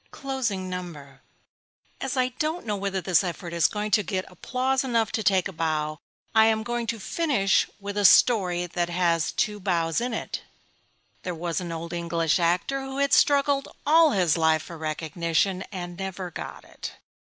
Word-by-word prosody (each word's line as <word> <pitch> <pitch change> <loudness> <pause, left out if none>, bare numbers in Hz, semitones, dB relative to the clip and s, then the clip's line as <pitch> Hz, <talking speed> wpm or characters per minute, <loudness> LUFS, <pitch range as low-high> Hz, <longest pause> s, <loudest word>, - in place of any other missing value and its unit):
CLOSING 240 -9 -3
NUMBER 155 -7 -7 0.8
As 270 0 -2
I 255 0 +2
don't 315 +1 -1
know 210 -2 -1
whether 195 -1 -2
this 180 0 +3
effort 175 -1 -5
is 170 -3 +4
going 210 0 -3
to 210 - +5
get 190 -2 -3
applause 260 - -1
enough 230 -4 +1
to 220 - -1
take 190 -4 +2
a - - -7
bow, 155 -2 -1 0.3
I 220 0 +6
am 220 -1 +2
going 240 0 -3
to 230 0 -2
finish 225 - +1
with 200 0 -6
a - - +1
story 185 -5 +5
that 175 0 -2
has 170 -2 +1
got - - -9
two 210 -1 0
bows 170 -2 0
in 245 -1 -2
it. - - -4 0.8
There 180 -1 -4
was 170 0 -2
an 175 -2 -5
old 165 +1 -5
English 170 -1 0
actor 180 +11 +1
who 270 0 -6
had 280 0 +1
struggled 280 -1 +4 0.2
all 320 +2 +6
his 180 - +2
life 160 -1 +3
for 170 - -9
recognition; 165 +4 -1
and 175 -2 -6
never 190 -2 -5
got - - -7
it. - - -8
190 Hz, 180 wpm, -26 LUFS, 170-230 Hz, 0.8 s, I